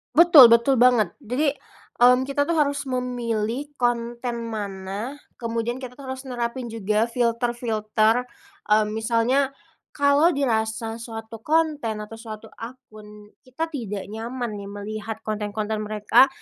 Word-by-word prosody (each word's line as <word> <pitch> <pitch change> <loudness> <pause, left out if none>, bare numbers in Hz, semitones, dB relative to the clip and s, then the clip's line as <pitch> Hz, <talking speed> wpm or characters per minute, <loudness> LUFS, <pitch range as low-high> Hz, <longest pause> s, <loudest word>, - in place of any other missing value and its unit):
Betul 320 -7 +10
betul 235 +2 +4
banget. 240 -7 +4
Jadi, 270 +4 0 0.5
hmm, 250 +1 +6
kita 285 +1 -1
tuh 335 - +1
harus 285 -2 0
memilih 245 0 -2
konten 235 -1 -2
mana, 205 +5 -5 0.2
kemudian 230 0 -2
kita 255 -1 -7
tuh 270 - -9
harus 260 +1 -5
nerapin 240 -1 -4
juga 215 0 0
filter-filter, 230 -1 +1 0.5
eee, 215 0 +5
misalnya, 230 +5 +1 0.4
kalau 285 +4 +4
dirasa 225 -4 -1
suatu 225 -1 -8
konten 300 -9 0
atau 225 +1 -9
suatu 220 -1 -9
akun, 215 -4 -12 0.2
kita 260 +6 -4
tidak 210 -8 -4
nyaman 230 0 -4
nih 200 - -8
melihat 215 +2 -6
konten-konten 215 0 -3
mereka, 210 +5 +4
235 Hz, 125 wpm, -24 LUFS, 215-260 Hz, 0.5 s, Betul